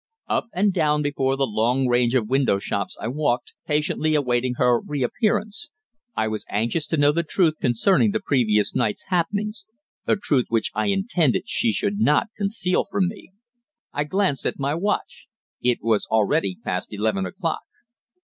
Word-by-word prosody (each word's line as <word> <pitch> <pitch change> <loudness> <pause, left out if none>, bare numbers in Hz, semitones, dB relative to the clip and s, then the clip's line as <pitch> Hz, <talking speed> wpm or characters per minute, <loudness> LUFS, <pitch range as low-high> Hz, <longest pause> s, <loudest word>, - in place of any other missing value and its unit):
Up - - 0
and 200 +2 +1
down 150 -4 +2
before 135 -2 0
the 135 - +2
long 120 +4 +1
range 120 0 +2
of 130 - +4
shop - - -9
windows 130 -7 +1 0.3
I - - -4
walked, 130 -1 -1
patiently 155 +1 +1
awaiting 125 -3 +1
her 120 -1 +3
reappearance. 210 - -1 0.5
I 110 - +1
was 110 0 -3
anxious 120 +9 -1
to 160 - -1
know 145 0 +5
the 170 +3 +1
truth 165 -1 +1
concerning 155 - +3
the 220 - 0
previous 110 - +2
night's 105 - -1
happenings 205 +3 -1 0.4
a - - +4
truth 145 - +1
which 115 -1 0
I - - 0
intended 195 - +1
she 235 - +1
should 205 -1 -1
not 225 +1 +3
conceal 200 -3 0
from 185 -3 +1
me. 205 - -11 0.6
I 145 - -1
glanced 185 -4 0
at - - -3
my 140 +1 -1
watch. 200 +6 -2 0.3
It 125 -1 +1
was 110 -2 +1
already 100 -3 +1
past 90 0 -3
eleven 105 -2 -1
o'clock. 180 -4 -3
145 Hz, 165 wpm, -23 LUFS, 120-190 Hz, 0.6 s, know